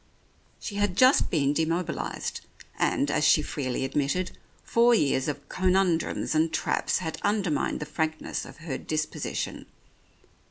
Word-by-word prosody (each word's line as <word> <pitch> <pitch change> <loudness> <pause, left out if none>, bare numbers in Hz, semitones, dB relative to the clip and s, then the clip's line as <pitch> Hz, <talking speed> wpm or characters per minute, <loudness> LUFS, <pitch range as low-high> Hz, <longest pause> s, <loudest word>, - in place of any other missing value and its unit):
She 200 - -6
had 205 -3 0
just 260 +2 +5
been 145 -4 +2
demobilized, 165 +2 -2 0.4
and, 140 - +1
as 150 - +1
she 150 0 +5
freely 130 -3 -2
admitted, 145 +7 -1 0.3
four 235 +1 +4
years 135 - +1
of 145 -1 -4
conundrums 185 -4 +1
and 160 +1 +2
traps - - 0
had 160 -3 -4
undermined 200 -7 0
the - - -2
frankness 160 +1 -2
of - - -11
her 135 -6 -3
disposition. 155 0 -3
160 Hz, 130 wpm, -27 LUFS, 145-185 Hz, 0.4 s, just